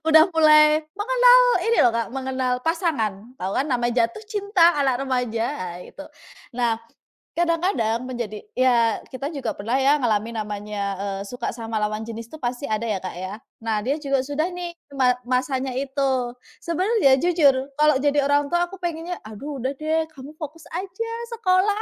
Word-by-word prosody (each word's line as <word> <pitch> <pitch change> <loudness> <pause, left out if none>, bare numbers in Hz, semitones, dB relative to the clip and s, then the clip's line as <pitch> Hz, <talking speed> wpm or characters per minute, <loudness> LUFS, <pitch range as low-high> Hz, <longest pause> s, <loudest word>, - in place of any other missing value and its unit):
Udah 315 0 +8
mulai 305 -1 +6 0.2
mengenal - - +6 0.3
ini 465 - +3
loh, 240 - +6
Kak, 230 -2 -1
mengenal 260 -1 -1
pasangan. 250 - -1
Tahu 190 -4 -3
kan 270 - 0
nama 245 -3 +1
jatuh 230 - 0
cinta 405 -5 +3
anak 265 -2 +1
remaja, 250 -4 -1
ah 180 -10 -5
itu. - - -13 0.6
Nah, 235 -2 +1 0.6
kadang-kadang 330 - +1
menjadi 235 -5 -4 0.2
ya 240 -3 +3 0.2
kita 275 +2 -4
juga 255 -5 -2
pernah 225 +5 -2
ya 285 +2 +4
ngalamin 225 -1 0
namanya, 210 0 -5
eee, 195 0 -4
suka 245 +2 -4
sama 225 -1 -6
lawan 215 +1 -1
jenis 230 0 -7
tuh 315 - -8
pasti 245 +3 -3
ada 215 +1 0
ya, 210 -3 0
Kak 185 - -5
ya. 185 +2 -5 0.3
Nah, 220 - +1
dia 280 +4 0
juga 275 -2 0
sudah 290 +4 -1
nih 355 -1 -5 0.3
ma 255 -1 +5 0.2
masanya 260 +1 0
itu. 265 -2 -1 0.3
Sebenarnya 365 - +3
jujur 290 -6 +3
kalau 300 0 +5
jadi 290 0 +2
orang 285 0 +2
tua 345 +2 +2
aku 390 0 -11
pengennya, 345 +1 -4
"Aduh 275 +7 -7
udah 260 - 0
deh 315 +2 0
kamu 280 0 -10
fokus 310 0 -7
aja 380 +6 -4 0.3
sekolah," 405 +1 +2
270 Hz, 170 wpm, -23 LUFS, 230-325 Hz, 0.6 s, Udah